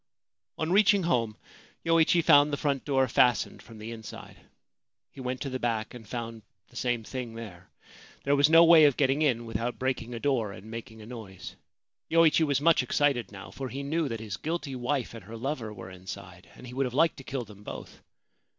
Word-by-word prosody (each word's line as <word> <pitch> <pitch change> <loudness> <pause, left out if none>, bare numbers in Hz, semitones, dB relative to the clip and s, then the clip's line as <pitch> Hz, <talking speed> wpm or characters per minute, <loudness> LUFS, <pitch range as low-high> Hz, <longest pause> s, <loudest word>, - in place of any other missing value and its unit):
On 160 +1 -2
reaching 200 0 +5
home 115 -9 0 0.5
Yoichi 165 +1 +4
found 145 0 +6
the 145 - -1
front 140 -3 -1
door 135 -2 +2
fastened 125 -1 +2
from 115 -1 -13
the 110 +2 -7
inside. 110 -2 -9 0.8
He 135 - -10
went 125 +1 -3
to 140 - -3
the 130 - -3
back, 115 -3 -2
and 115 -3 -11
found 115 -2 -5 0.3
the 125 - -21
same 120 -2 -1
thing 120 -1 -6
there. 95 -6 -10 0.5
There 140 +1 +3
was 145 +1 +5
no 165 +1 +8
way 165 -2 +8
of 140 -3 +3
getting 140 +1 +2
in 120 -6 +1
without 115 +2 -3
breaking 125 -2 -2
a - - -5
door 115 -7 0
and 105 +4 -11
making 110 -1 -8
a - - -11
noise. 105 -6 -9 0.5
Yoichi 165 -1 +5
was 140 -3 +2
much 165 -1 +4
excited 130 -2 +1
now; 100 0 -10
for 135 -1 -6
he 140 +3 -5
knew 155 +2 0
that 115 -2 -4
his 105 -6 -5
guilty 155 - -3
wife 125 0 -2
and 115 -5 -10
her 115 +2 -8
lover 125 -3 -3
were 95 -3 -9
inside, 90 -1 -10
and - - -12
he 125 - -9
would 135 0 0
have 125 - -7
liked 160 +2 +3
to 135 - -10
kill 130 -2 -4
them 105 -1 -14
both. - - -9
125 Hz, 205 wpm, -28 LUFS, 115-145 Hz, 0.8 s, no